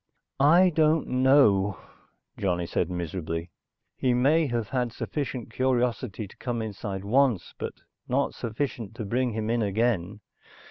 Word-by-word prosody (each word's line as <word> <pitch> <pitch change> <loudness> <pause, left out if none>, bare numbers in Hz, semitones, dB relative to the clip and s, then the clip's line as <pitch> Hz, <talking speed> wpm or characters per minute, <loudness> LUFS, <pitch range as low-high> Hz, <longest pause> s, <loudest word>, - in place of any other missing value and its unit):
"I 170 +6 +6
don't 155 -1 +2
know," 125 -7 +4 0.6
Johnny 90 -3 -1
said 85 +1 -1
miserably. 85 -1 -4 0.4
"He 125 -2 +1
may 150 +6 +3
have 120 -4 -2
had 125 -3 -1
sufficient 130 -1 -4
curiosity 125 -4 0
to - - -18
come 120 -2 -3
inside 100 -3 -5
once, 120 -4 +2
but - - -4 0.3
not - - 0
sufficient 115 -2 -4
to 110 - -5
bring 120 +3 0
him 110 +1 -2
in 120 0 +1
again. 105 -2 0
115 Hz, 135 wpm, -27 LUFS, 100-130 Hz, 0.6 s, I